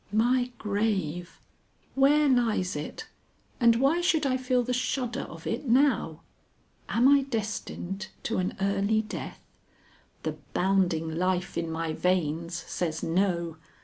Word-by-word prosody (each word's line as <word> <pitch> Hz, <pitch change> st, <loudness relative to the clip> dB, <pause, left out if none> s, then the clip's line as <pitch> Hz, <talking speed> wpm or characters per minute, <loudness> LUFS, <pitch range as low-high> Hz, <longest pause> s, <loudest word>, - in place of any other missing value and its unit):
My 245 Hz, +3 st, +2 dB
grave! 200 Hz, -5 st, -2 dB, 0.5 s
where 290 Hz, +2 st, +4 dB
lies 230 Hz, -, +2 dB
it, 150 Hz, -, -6 dB, 0.5 s
and 235 Hz, -2 st, +5 dB
why 275 Hz, +8 st, +3 dB
should 325 Hz, -4 st, +2 dB
I 260 Hz, -1 st, +2 dB
feel 255 Hz, -1 st, +1 dB
the 250 Hz, +1 st, -2 dB
shudder 250 Hz, 0 st, -1 dB
of -, -, -11 dB
it 285 Hz, -, -3 dB
now? 240 Hz, -, +2 dB, 0.7 s
Am 240 Hz, +3 st, +4 dB
I 280 Hz, 0 st, +6 dB
destined 210 Hz, -5 st, -4 dB, 0.2 s
to 230 Hz, -, -1 dB
an 185 Hz, -, -2 dB
early 200 Hz, +2 st, +1 dB
death? 215 Hz, -, -7 dB, 0.8 s
The -, -, -3 dB, 0.2 s
bounding 175 Hz, -4 st, +1 dB
life 185 Hz, 0 st, 0 dB
in 165 Hz, -1 st, -2 dB
my 160 Hz, 0 st, -2 dB
veins 170 Hz, -1 st, 0 dB
says 160 Hz, -3 st, -3 dB
no. 170 Hz, -2 st, 0 dB
210 Hz, 130 wpm, -28 LUFS, 175-255 Hz, 0.8 s, I